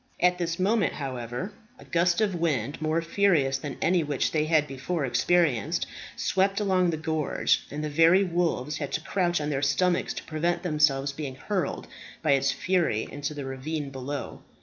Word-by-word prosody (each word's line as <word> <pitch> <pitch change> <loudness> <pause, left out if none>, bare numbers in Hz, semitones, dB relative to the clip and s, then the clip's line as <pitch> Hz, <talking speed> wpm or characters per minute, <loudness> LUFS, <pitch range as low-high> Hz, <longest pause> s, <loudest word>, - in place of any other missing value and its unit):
At 180 0 +3
this 170 -1 -1
moment, 200 +1 +2
however, 130 - -5 0.2
a - - -14
gust 175 +3 +2
of 205 -3 +2
wind, 145 -6 -1
more 155 +2 0
furious 165 -7 +2
than 140 0 -6
any 180 -1 +3
which 145 -2 -1
they 155 -1 +1
had 155 -1 +3
before 140 +3 -3
experienced, 145 - +2 0.3
swept 195 +2 +1
along 185 -3 +2
the 160 - -1
gorge, 155 -2 0
and 150 +2 -5
the - - -1
very 165 +6 +5
wolves 170 -5 -1
had 145 -3 -4
to 160 - 0
crouch 175 -1 0
on 150 0 -2
their 135 -1 -1
stomachs 175 +6 +1
to - - -5
prevent 170 +3 -1
themselves 150 -4 +2
being 140 -2 -6
hurled 185 +2 -2 0.4
by - - +3
its 135 0 +3
fury 175 - 0
into 145 +1 -4
the 145 -2 -5
ravine 140 +2 -4
below. 135 +2 -5
155 Hz, 175 wpm, -27 LUFS, 140-175 Hz, 0.4 s, very